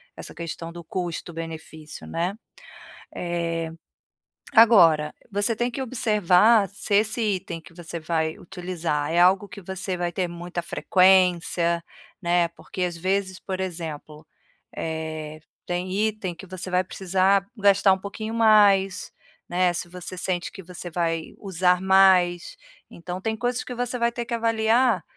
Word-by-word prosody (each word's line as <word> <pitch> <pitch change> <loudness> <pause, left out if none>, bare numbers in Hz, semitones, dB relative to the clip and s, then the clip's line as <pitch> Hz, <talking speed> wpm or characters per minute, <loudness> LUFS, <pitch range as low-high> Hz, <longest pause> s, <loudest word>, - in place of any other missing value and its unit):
essa - - -9
questão 165 0 -6
do 170 0 -10
custo-benefício, 165 -3 -6
né. 175 +4 -2 0.8
Eh, 170 -2 -3 0.8
agora, 170 -10 +6 0.2
você 205 +3 +1
tem 240 +1 0
que 255 - -6
observar 215 -3 +3
se 200 +1 -2
esse 220 +3 +1 0.2
item 170 -2 -7
que - - -16
você 170 -1 -7
vai 160 0 -1
utilizar 175 -5 -3
é 170 - +1
algo 190 +3 +4
que 200 - -10
você 190 0 -4
vai 175 0 -2
ter 180 0 -1
muita 175 +1 -5
frequência, 180 -2 +3 0.4
né, 175 -1 +2
porque 175 +2 -8
às 175 -1 -1
vezes, 190 +1 -1
por 190 -1 -5
exemplo, 160 -4 -6 0.5
eh, 160 -1 -5 0.3
tem 180 +1 -3 0.2
item 205 -5 -5
que 195 +3 -12
você 185 0 -5
vai 180 +1 +2
precisar 190 +1 +1
gastar 200 -1 +4
um 190 - -7
pouquinho 215 +3 -6
mais, 205 -4 +4 0.4
né, 180 0 +2
se 175 +1 -4
você 180 +1 -6
sente 180 -2 -2
que 190 - -10
você 175 0 -8
vai 165 -1 -2
usar 180 -2 +1
mais. 190 -2 +4 0.3
Então, 180 +2 -7
tem 220 +1 -1
coisas 245 +1 -1
que 250 - -6
você 245 +1 -2
vai 235 0 +1
ter 235 -1 -5
que 235 - -3
avaliar, 230 -2 +2
180 Hz, 145 wpm, -24 LUFS, 170-200 Hz, 0.8 s, agora